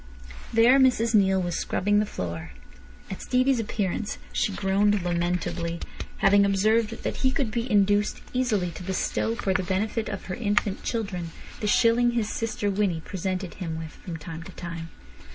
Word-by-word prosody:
There 235 +4 +6
Mrs 240 -3 +3
Neale 190 -2 +4
was 175 -1 -2
scrubbing 205 +2 +1
the 210 - 0
floor. 85 - -5 0.6
At 190 - -6
Stevie's 255 0 +2
appearance 205 -1 -2 0.2
she - - +1
groaned 200 0 +2
lamentably, 175 -1 -1 0.4
having 200 0 +5
observed 215 +3 +2
that - - -2
he 260 - +2
could 260 -3 -1
be 235 +2 -2
induced 205 0 +3
easily 220 -9 +1
to 165 - -9
bestow 190 +4 -1
for 195 -5 0
the 185 - +1
benefit 205 +5 -1
of 205 -2 -5
her 185 - -4
infant 205 -3 0
children 195 -7 -3 0.3
the 210 - -2
shilling 240 +2 +4
his 225 -3 0
sister 215 -3 -1
Winnie 190 -5 0
presented 185 -2 -3
him 165 -3 -3
with 160 -1 -6
from 170 -3 -8
time 160 +1 -7
to 165 - -10
time. 165 -1 -6
200 Hz, 165 wpm, -26 LUFS, 180-225 Hz, 0.6 s, There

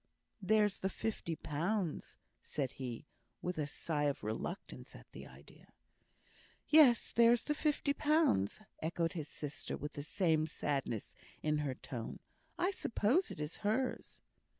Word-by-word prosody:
"There's 210 0 +3
the 190 - 0
fifty 200 -5 -3
pounds," 170 +4 -2 0.2
said 135 -4 -2
he, 125 -1 -6 0.4
with 180 -2 -2
a 150 - 0
sigh 150 -1 -1
of 140 -5 -1
reluctance 110 - -5
at - - -12
the - - -9
idea. - - -17 0.9
"Yes, 295 -6 +6
there's 235 0 +5
the 295 - 0
fifty 295 -1 +1
pounds," 295 - +2 0.2
echoed 165 +1 0
his 155 -4 -4
sister, 145 0 -5
with 150 0 -5
the 145 - -5
same 160 0 +2
sadness 140 -8 -2 0.3
in 150 0 +2
her 140 -3 -1
tone. 120 -4 -6 0.4
"I 365 +3 +2
suppose 310 - +1
it - - -8
is 150 +1 -4
hers." 220 +5 -1
165 Hz, 140 wpm, -35 LUFS, 145-225 Hz, 0.9 s, Yes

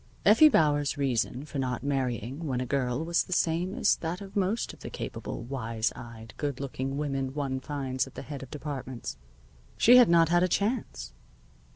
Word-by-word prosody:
Effie 225 +10 +8
Bauer's 150 - +2
reason 130 0 -1
for 145 - -5
not 125 -2 -2
marrying 135 +1 -2
when 130 -3 -1
a 125 - -2
girl 130 +3 -1
was 170 +1 +2
the - - -14
same 175 +2 +1
as 215 - +3
that 170 +2 -4
of 195 -1 -10
most 200 +3 0
of - - -15
the - - -7
capable, - - -6
wise 115 -3 -2
eyed, 115 -2 -10
good 145 -3 -3
looking 135 0 -3
women 135 -2 -2
one 135 -3 -2
finds 130 -2 -2
at 135 - -14
the - - -6
head 145 -3 -7
of 135 - -9
departments. 135 -4 -6 0.6
She 245 +2 +7
had 245 -5 +7
not 165 -1 +5
had 175 0 +4
a 185 - +4
chance. 200 - -2
140 Hz, 190 wpm, -28 LUFS, 130-170 Hz, 0.6 s, Effie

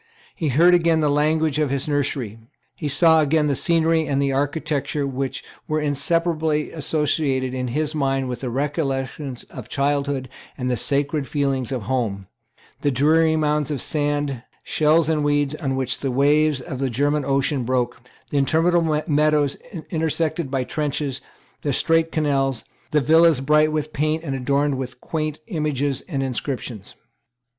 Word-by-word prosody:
He 160 - -3
heard 165 +7 +5
again 165 -2 +3
the 150 -1 +2
language 155 0 +1
of 150 -2 +1
his 140 +2 -2
nursery. 135 -6 -2 0.4
He 155 - -4
saw 160 +3 +5
again 150 +1 +2
the 145 -2 +1
scenery 165 0 +2
and 140 -1 0
the 140 -1 +1
architecture 145 0 -1
which 135 0 -3 0.2
were 155 0 0
inseparably 155 +1 0
associated 145 -4 0
in 130 -1 -2
his 150 +5 -1
mind 135 -3 0
with 125 -1 -4
the 130 - -4
recollections 135 -1 -3
of 125 - -9
childhood 140 -1 0 0.3
and 125 -2 -2
the - - +1
sacred 140 +2 0
feeling 135 -4 -1
of 125 -5 -3
home; 110 -5 -2 0.6
the 145 - +2
dreary 160 +4 +3
mounds 150 -2 +1
of 145 -3 -2
sand, 145 -3 -1 0.2
shells 155 +1 +2
and 155 -2 +1
weeds, 145 -1 +1
on 140 -4 -2
which 130 -1 -1
the 135 - -2
waves 145 +2 +3
of 130 0 -6
the 135 -1 0
German 145 +4 +1
Ocean 135 0 0
broke; 120 0 -1 0.3
the 145 - 0
interminable 160 +2 +2
meadows 150 -1 +2 0.4
intersected 160 -1 -1
by 135 -1 -1
trenches; 145 -1 -2 0.4
the 145 - -1
straight 165 +4 +2
canals; 135 -5 0 0.3
the 150 -1 +2
villas 160 +1 +5
bright 150 +3 +3
with 155 0 -3
paint 155 +2 0
and 140 -4 -3
adorned 140 +1 0
with 125 -1 -6
quaint 155 0 -3
images 145 - -1
and 135 -5 -1
inscriptions. 125 -5 -5
145 Hz, 155 wpm, -22 LUFS, 135-155 Hz, 0.6 s, heard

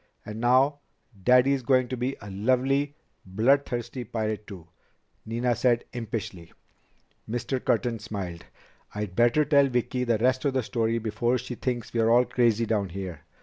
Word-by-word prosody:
"And 105 +1 -6
now 130 +4 +3 0.4
Daddy 125 +3 +5
is 135 - -1
going 130 0 +2
to 130 - -2
be 125 +2 -2
a 100 -1 -8
lovely, 130 +7 +1 0.3
bloodthirsty 120 +4 0
pirate 110 -2 -3
too," 90 -6 -10 0.6
Nina 120 +2 0
said 120 0 +2
impishly. 110 -7 -5 0.8
Mr. 120 +3 -2
Curtin 115 +1 0
smiled. 100 -6 -6 0.5
"I'd 105 -3 -4
better 120 +7 +4
tell 140 -1 +4
Vicki 125 0 -1
the 120 -2 +1
rest 130 +3 +1
of 140 -2 0
the 130 - +1
story 115 0 0
before 115 +2 0
she 125 - -6
thinks 120 -1 -3
we're 115 -1 +2
all 120 +2 +5
crazy 115 -2 +2
down 105 -3 0
here. 90 -4 -6
120 Hz, 155 wpm, -26 LUFS, 110-130 Hz, 0.8 s, Daddy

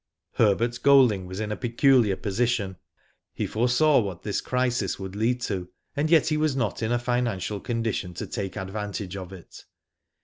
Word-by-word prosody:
Herbert 115 +3 +2
Golding 125 -9 +5
was 95 +2 -6
in 110 -1 -3
a - - -1
peculiar 120 -3 +3
position. 100 -1 -1 0.6
He - - -1
foresaw 125 +6 +3
what 95 -6 -4
this 105 - -2
crisis 125 -6 -1
would 95 0 -7
lead 120 +4 0
to, 95 -6 -3 0.3
and 150 +2 0
yet 160 -1 +4
he 155 - +1
was 155 -3 +1
not 120 -5 -1
in 110 +1 -1
a 120 - +3
financial 120 -5 -1
condition 115 -6 -3
to - - -4
take 100 -2 -5
advantage 100 0 -5
of 95 -2 -7
it. 95 -3 -12
110 Hz, 170 wpm, -26 LUFS, 95-125 Hz, 0.6 s, Golding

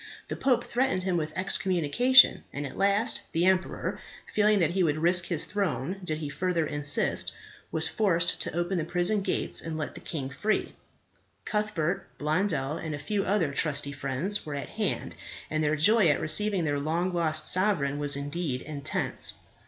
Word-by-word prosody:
The - - -3
pope 260 -3 +1
threatened 245 -7 0
him 185 -1 0
with 155 -2 -2
excommunication; 190 - +4
and 145 +1 -5
at 140 - -7
last 200 +4 +2
the 170 +2 +2
emperor, 185 0 0 0.3
feeling 210 0 +4
that 170 -5 +2
he 190 +2 0
would 155 -4 +1
risk 175 +2 +2
his 165 -3 -1
throne 200 -2 -2
did 155 -3 -2
he 155 -1 -5
further 165 +3 -1
insist, 145 -1 +2 0.4
was 160 0 0
forced 175 -6 +1
to - - -2
open 175 +1 0
the - - -1
prison 175 +5 0
gates - - -1
and 160 -1 -5
let 155 - -4
the - - -10
king 140 -5 -4
free. 215 +10 -1 0.7
Cuthbert, 195 -5 -1
Blondel, 150 -2 -1
and 155 -2 -4
a - - -6
few 195 +7 -2
other 185 -7 +1
trusty 145 -1 -1
friends 140 +9 -2
were 150 -3 -6
at 140 - -5
hand, 215 -2 -2 0.4
and 155 0 0
their 150 +1 +2
joy 205 +5 +4
at 145 - +3
receiving 190 +4 +1
their 145 -2 0
long 170 +5 -1
lost 160 -2 0
sovereign 175 -8 +2
was 145 -1 +2
indeed 145 -2 -3
intense. 145 -2 -2
170 Hz, 175 wpm, -27 LUFS, 150-195 Hz, 0.7 s, excommunication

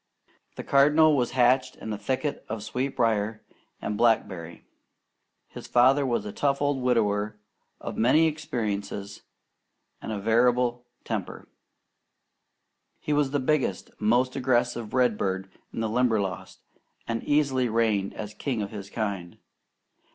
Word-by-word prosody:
The - - -6
Cardinal 150 +3 +5
was 125 -3 +1
hatched 130 +1 +3
in 110 - -6
a - - -4
thicket 135 +6 -2
of 110 -1 -4
sweetbrier 115 -4 -1 0.4
and 105 - -4
blackberry. 95 -8 0 0.8
His - - -10
father 130 +3 +4
was 115 -4 -1
a 105 - -5
tough 140 +5 0
old 145 -2 0
widower 105 -4 +1 0.4
of - - -6
many 140 +8 +5
experiences 105 -9 -3 0.8
and 110 -2 -4
variable 120 +2 +2 0.2
temper. - - -5 1.5
He 150 - -2
was 145 -2 +2
the 145 +1 0
biggest, 130 -7 0
most 120 +4 +2
aggressive 120 -3 0
redbird 100 -6 0 0.2
in - - -4
the 110 - 0
Limberlost, 110 -6 -1 0.4
and 115 -1 -2
easily 135 -4 +2
reigned 110 -3 +1 0.2
king 125 -7 -1
of 100 - -6
his 100 -2 -8
kind. 100 -6 -4
120 Hz, 120 wpm, -26 LUFS, 105-130 Hz, 1.5 s, Cardinal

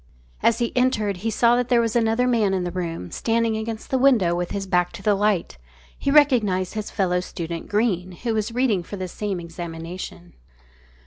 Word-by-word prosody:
As 230 - +3
he 235 0 -2
entered 220 -6 +1
he 220 +5 -2
saw 235 +2 +3
that 245 0 0
there 245 -2 +4
was 230 -1 0
another 230 +1 +2
man 215 -6 +2
in 185 - -1
the 175 - -3
room, 165 - -4
standing 230 -1 0
against 220 0 -5
the 265 - +2
window 240 -10 +4
with 175 0 -2
his 200 -1 -3
back 180 -2 +1
to - - -9
the 210 - +3
light. 200 - 0 0.4
He - - -2
recognised 235 -11 +3
his 215 -1 -4
fellow 180 -3 0
student 170 -2 -6
Greene, 190 -4 0
who 230 +6 -3
was 215 +1 -1
reading 235 -6 +1
for 200 +4 -8
the 185 -1 -4
same 195 0 -3
examination. 170 +1 -7
205 Hz, 195 wpm, -23 LUFS, 180-230 Hz, 0.4 s, there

